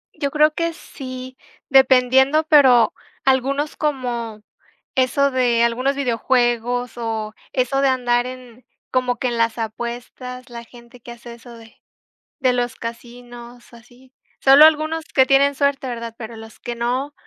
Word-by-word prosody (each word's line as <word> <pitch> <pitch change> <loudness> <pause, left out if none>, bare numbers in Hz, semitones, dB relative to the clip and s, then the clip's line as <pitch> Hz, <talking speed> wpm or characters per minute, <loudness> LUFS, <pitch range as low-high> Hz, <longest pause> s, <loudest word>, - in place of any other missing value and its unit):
Yo 280 - -2
creo 300 +1 +3
que 335 0 -2
sí, 255 -3 -9 0.3
dependiendo, 265 +2 +4
pero 260 -7 +5 0.3
algunos 275 +3 0
como 240 -7 -3 0.5
eso 265 +2 +2
de 245 -3 +2
algunos 255 +4 0
videojuegos, 245 -1 0
o 220 -2 -4 0.2
eso 265 +1 0
de 275 - +3
andar 245 -1 +1
en 255 -1 -11 0.3
como 250 -1 0
que 255 - -2
en 240 - -3
las 230 0 0
apuestas, 245 +3 -7
la 235 0 -8
gente 235 +1 -17
que 240 - -11
hace 235 0 -11
eso 235 0 -14
de 225 0 -17 0.6
de 255 -2 +2
los 245 -1 -2
casinos, 240 +1 -10
o - - -15
así. 245 +3 -21 0.3
Solo 275 +3 +7
algunos 315 +1 +1
que 265 -4 +3
tienen 275 +1 +3
suerte, 280 -1 0
¿verdad?, 235 -2 -6
pero 230 0 -8
los 220 0 -13
que 240 - -6
no, 250 +5 -2
250 Hz, 150 wpm, -20 LUFS, 235-270 Hz, 0.6 s, Solo